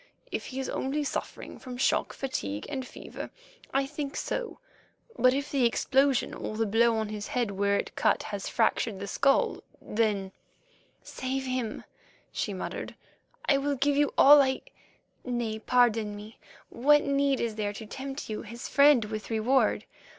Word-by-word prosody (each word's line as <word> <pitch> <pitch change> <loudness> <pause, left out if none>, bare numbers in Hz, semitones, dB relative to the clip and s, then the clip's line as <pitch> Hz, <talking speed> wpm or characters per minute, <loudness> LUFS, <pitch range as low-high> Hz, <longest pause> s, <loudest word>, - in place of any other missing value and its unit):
"If - - -3
he 265 - -5
is 265 - -2
only 285 +3 -1
suffering 285 - -5
from 250 -2 -8
shock, 255 - +1
fatigue, 105 - -4
and 260 -1 -4
fever, - - -8 0.4
I 275 0 +1
think 285 0 -5
so, - - -3 0.6
but 255 - +5
if 280 +2 -2
the 275 -3 +2
explosion 270 +2 +2
or 215 - -5
the 225 - +1
blow 225 +2 +3
on 220 -1 -2
his 210 -1 -5
head 240 -4 -1
where 200 +1 +1
it - - -4
cut - - +2
has 205 -2 -5
fractured 225 -3 +1
the 200 - -4
skull, 275 +7 +2 0.2
then——" 210 -3 -1 0.7
"Save 265 +1 -3
him," 255 -4 -3 0.5
she - - -2
muttered. - - -5 0.5
"I 275 - +4
will 285 +1 0
give 280 +2 +1
you 290 0 +3
all 290 +1 +9
I—nay, 240 -3 -4
pardon 225 -3 +2
me; 210 +2 -11 0.3
what 295 +4 +4
need 280 -1 +1
is 230 -2 -1
there 210 -1 -2
to 220 - -8
tempt 270 +5 -6
you, 215 - -4
his 230 +2 -8
friend, 280 -5 +5
with 215 0 -6
reward? 235 +4 +2
250 Hz, 160 wpm, -28 LUFS, 215-275 Hz, 0.7 s, all